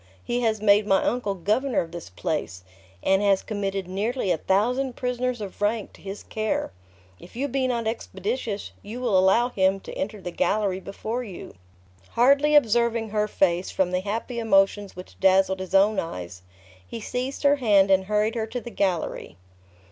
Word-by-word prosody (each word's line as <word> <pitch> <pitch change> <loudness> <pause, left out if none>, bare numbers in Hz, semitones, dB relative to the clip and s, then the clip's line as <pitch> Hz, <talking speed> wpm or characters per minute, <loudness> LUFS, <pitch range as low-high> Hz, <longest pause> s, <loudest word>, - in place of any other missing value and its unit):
He 245 +1 -1
has 220 -2 0
made 205 0 +5
my 195 -1 +3
uncle 220 -5 -1
governor 215 +8 0
of 165 - -7
this 170 - -8
place, 90 0 -4 0.4
and 195 +1 +3
has 200 -2 +3
committed 195 -3 -3
nearly 205 +2 -1
a 165 - +1
thousand 245 +7 +1
prisoners 250 -1 -2
of 200 0 -8
rank 210 +1 -1
to - - -17
his 195 +1 -7
care. 215 -1 -2 0.5
If 180 - -15
you 270 +4 -1
be 265 -1 0
not 235 -2 -1
expeditious, 220 0 -3
you 220 +4 -7
will 240 -6 0
allow 190 +6 +4
him 190 -3 +1
to - - -9
enter 210 +2 -4
the 180 -2 -6
gallery 200 0 0
before 220 +5 -5
you." 195 -7 -9 0.6
Hardly 280 +5 +4
observing 235 -3 +3
her 210 0 0
face, 180 -3 +1
from 185 -2 0
the 180 - +1
happy 225 +5 -4
emotions 200 -2 +2
which 180 0 -11
dazzled 190 0 +3
his 185 0 -4
own 200 +2 +4
eyes, 90 - -6 0.5
he - - -6
seized 255 +6 -4
her 285 0 +5
hand, 200 -6 +4
and 190 0 +4
hurried 210 +2 +1
her 225 -2 -2
to 240 +3 -4
the 240 0 -9
gallery. 175 - -2
210 Hz, 180 wpm, -25 LUFS, 190-235 Hz, 0.6 s, made